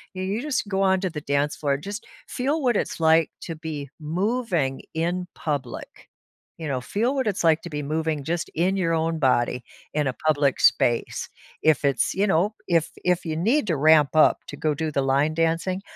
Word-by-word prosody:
y 185 - -4
you 200 +5 -2
just 275 -7 -2
go 195 -1 0
on 190 -1 +3
to 185 - -1
the 150 -2 -6
dance 145 +1 0
floor, 140 -2 0
just 200 +9 -7 0.2
feel 285 +5 -1
what 240 -5 +3
it's - - -3
like 160 0 +4
to 165 - -6
be 150 -4 -6
moving 175 - -1
in 175 +3 -1
public, 140 -6 -5 0.5
you 160 - -7
know, 130 -2 -1
feel 230 - 0
what 260 -4 0
it's 200 -4 -1
like 160 -1 +4
to 175 - -6
be 150 -2 -4
moving 155 0 -2
just 170 +3 -2
in 185 +4 +1
your 165 -3 +1
own 165 0 0
body 125 -3 +2 0.3
in 150 -2 0
a 130 - -1
public 145 -3 +2
space. 120 -1 +2 0.4
If 155 -4 +3
it's, 135 -4 +1
you 200 - +2
know 190 +5 +1
if 165 -2 +2
if 180 0 +1
you 160 -1 -2
need 220 - +1
to 165 - +1
ramp 150 -1 +5
up 155 - +6
to - - -7
go 155 -1 0
do 155 +2 -3
the 140 - +1
line 140 +3 +2
dancing, 165 +3 0
160 Hz, 205 wpm, -24 LUFS, 150-190 Hz, 0.5 s, up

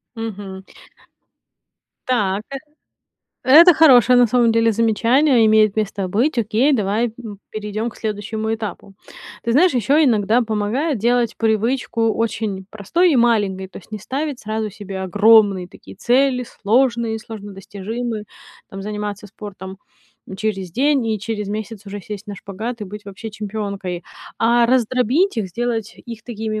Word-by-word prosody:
Мгм. 200 -4 -6 1.5
Так, 210 -5 0
э 275 - -4 0.9
это 330 +7 +8
хорошее, 255 -5 +6
на 245 - +6
самом 235 0 +3
деле, 230 0 +3
замечание, 230 +3 +3
имеет 215 -1 +4
место 200 -3 -2
быть. 240 - 0
Окей, 235 +6 +2
давай, 215 0 +1 0.2
м, 205 -2 -8
перейдём 215 +1 -4
к - - -11
следующему 220 +1 -3
этапу. 210 -3 -6 0.5
Ты 235 - -1
знаешь, 340 +7 +4
ещё 275 +7 +3
иногда 230 -2 +3
помогает 225 +6 -1
делать 240 +1 +1
привычку 225 0 0
очень 215 -4 -3
простой 320 - +1
и - - +3
маленькой, 205 -6 +1
то 185 - -11
есть 190 - -18
не 215 - -4
ставить 275 +5 -4
сразу 215 0 -3
себе 195 -1 -7
огромные 200 -1 +4
такие 95 - -14
цели, 255 +1 +2
сложные, 230 0 0
сложно 210 -2 -9
достижимые. 210 +3 -5 0.4
Там, 195 0 -8
заниматься 210 0 -5
спортом 195 -2 -10 0.6
через 195 -4 -3
день 270 - +1
и 215 -1 -1
через 210 -1 -4
месяц 210 0 -6
уже 205 +1 -6
сесть 205 +2 -8
на 205 - -6
шпагат 215 +5 -6
и - - -3
быть 205 +1 -10
вообще 205 +3 -8
чемпионкой, 200 -4 -5 0.4
а 235 +1 +3
раздробить 255 - +1
их, 210 - -1
сделать 225 +1 -3
их 230 -2 -8
такими 220 -2 -4
220 Hz, 145 wpm, -20 LUFS, 205-240 Hz, 1.5 s, это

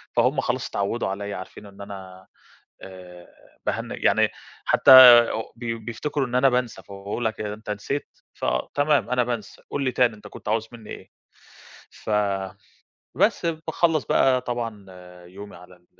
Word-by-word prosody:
فهُم 125 +4 +2
خلاص 130 0 -2
اتعودوا 100 +3 -2
عليَّ، 100 +1 -4
عارفين 95 +2 -9
إن 100 0 -13
أنا 95 -2 -10 0.6
آآ، 90 -2 -12 0.4
باهنِّج - - -4
يعني - - +4 0.4
حتى - - +3 0.4
أو 110 - -5
بي 115 -1 -4
بيفتكروا 130 +5 -3
إن 125 - -8
أنا 130 +2 +4
بانسى، 125 -3 -2
فبيقولها 100 +3 -4
كده 105 -1 -6
أنت 110 0 -10
نسيت؟ 120 +8 -4 0.2
فتمام 145 - 0
أنا 125 -1 +2
بانسى، 115 -5 -6
قُل 140 - -2
لي 130 - 0
تاني 120 -3 +2
أنت 105 0 -15
كنت - - -10
عاوز 110 +1 -1
مني 115 -3 -12
إيه؟ - - -10 0.8
ف - - -9 1.1
بس - - +2
باخلّص 160 -1 0
بَقَى 130 -1 +3
طبعًا 115 -5 -5 0.4
يومي 100 +2 -11
على 90 +1 -16
ال 90 0 -31
110 Hz, 150 wpm, -24 LUFS, 100-125 Hz, 1.1 s, يعني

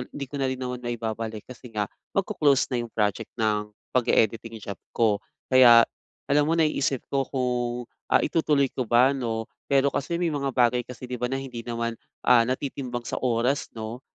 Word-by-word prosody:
hindi 140 -1 -6
ko 145 - -6
na - - +1
rin 130 0 -3
naman 125 -1 -4
maibabalik 110 -2 -3
kasi 125 -1 -11
nga 105 -2 -1 0.3
magko-close 145 -8 +2
na 125 - +1
'yong 115 - -11
project 105 0 -1
ng 105 -1 0 0.2
pag-e-editing 115 -2 +1
job 100 -2 -6 0.2
ko. 110 -3 +3 0.3
Kaya 120 -3 +9 0.5
alam 145 +1 +4
mo, 165 - +3
naiisip 140 -5 +1
ko 135 -1 +1
kung, 125 -2 -1 0.2
ah, - - +4
itutuloy 145 -4 +2
ko 130 - -2
ba, 125 +4 +5
'no? 115 -4 -2 0.2
Pero 140 0 +3
kasi 170 +5 -1
may 170 -1 0
mga 140 -3 -2
bagay 125 0 +3
kasi, 125 0 -9
'di 125 0 -5
ba, 125 - +1
na 135 - -1
hindi 135 -3 -6
naman, 115 -1 -2 0.3
ah, 120 -2 +6
natitimbang 130 -2 -3
sa - - -3
oras, 125 +2 +1
'no? 110 +2 -6
125 Hz, 180 wpm, -26 LUFS, 115-135 Hz, 0.5 s, Kaya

